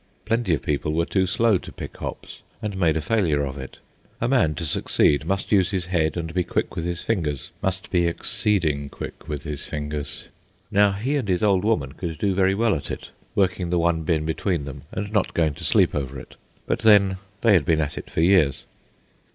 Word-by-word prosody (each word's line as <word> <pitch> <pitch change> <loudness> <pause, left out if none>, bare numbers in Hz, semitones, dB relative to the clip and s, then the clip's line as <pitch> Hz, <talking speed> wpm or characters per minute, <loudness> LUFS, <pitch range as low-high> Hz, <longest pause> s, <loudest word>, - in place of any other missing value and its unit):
Plenty 115 -6 +1
of 70 - -7
people 75 +1 -1
were 85 +1 +1
too 95 +1 +1
slow 105 0 +3
to - - -10
pick - - -8
hops - - -7 0.2
and 105 -2 -4
made 85 -5 +2
a - - -1
failure 80 -6 +1
of 65 -1 -5
it. 65 - -8 0.4
A 120 - 0
man, 120 - +3
to 85 - -3
succeed, 75 0 +2
must 95 +3 -1
use 95 -3 +4
his 95 -3 -1
head 85 -3 0
and 80 -1 -4
be 90 0 +1
quick - - -2
with 85 - -3
his 85 -1 -3
fingers, 80 - -2
must 95 0 -2
be 85 -2 +3
exceeding 85 -5 0
quick 75 - -8
with 75 -2 -4
his 75 -2 -5
fingers. 75 0 -5 0.4
Now 100 0 +4
he 125 +9 -1
and 130 -7 -2
his 90 0 +1
old 100 -3 +3
woman 105 - +1
could 80 +1 -5
do 100 +3 +1
very 95 0 +3
well 115 0 +2
at 70 - -4
it, - - -6 0.2
working 95 -2 +1
the 90 - +1
one 85 -1 +2
bin 80 -1 0
between 80 -1 -1
them 70 - -8
and 105 0 -4
not 105 -3 +1
going 80 -3 +2
to - - -10
sleep - - +3
over 70 -2 -3
it; - - -12 0.3
but - - 0
then, 100 -3 +5 0.2
they 115 -3 +5
had 90 -6 +5
been 80 +1 +2
at 75 -2 -1
it - - -7
for - - -1
years. 85 -6 +4
85 Hz, 215 wpm, -24 LUFS, 75-100 Hz, 0.4 s, then